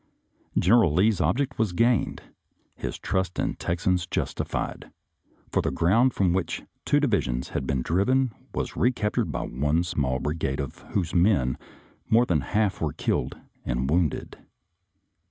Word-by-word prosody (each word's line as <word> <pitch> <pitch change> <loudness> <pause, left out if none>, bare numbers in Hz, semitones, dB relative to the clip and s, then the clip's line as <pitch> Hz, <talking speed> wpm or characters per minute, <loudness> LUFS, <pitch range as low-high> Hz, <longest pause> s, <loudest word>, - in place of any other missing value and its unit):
General 105 -2 +5
Lee's 100 +6 +3
ob - - +2
ject 135 -3 -2
was 110 -5 +1
gained, 115 +4 +1 0.5
his - - -5
trust 95 -2 -2
in - - +1
the - - -9
Texans 90 +1 0
justified, - - -3 0.6
for - - +2
the - - 0
ground 115 +9 +3
from 90 -3 +2
which 90 -2 -2 0.2
two 145 - +3
divisions 100 - 0
had 65 - -3
been 65 -2 0
driven 115 - +2 0.2
was - - -3
recaptured 115 -5 +1
by - - -2
one 75 +6 0
small 70 -7 -1
bri 75 +3 -2
gade 70 -4 -2
of 70 -3 -5
whose 90 -4 0
men 85 - +3 0.5
more 115 +2 +5
than 85 -9 +2
one 70 - -7
half 105 -2 +1
were 75 -4 -1
killed - - -1 0.3
and 65 +3 -1
wounded. 85 -3 0
90 Hz, 155 wpm, -26 LUFS, 75-110 Hz, 0.6 s, General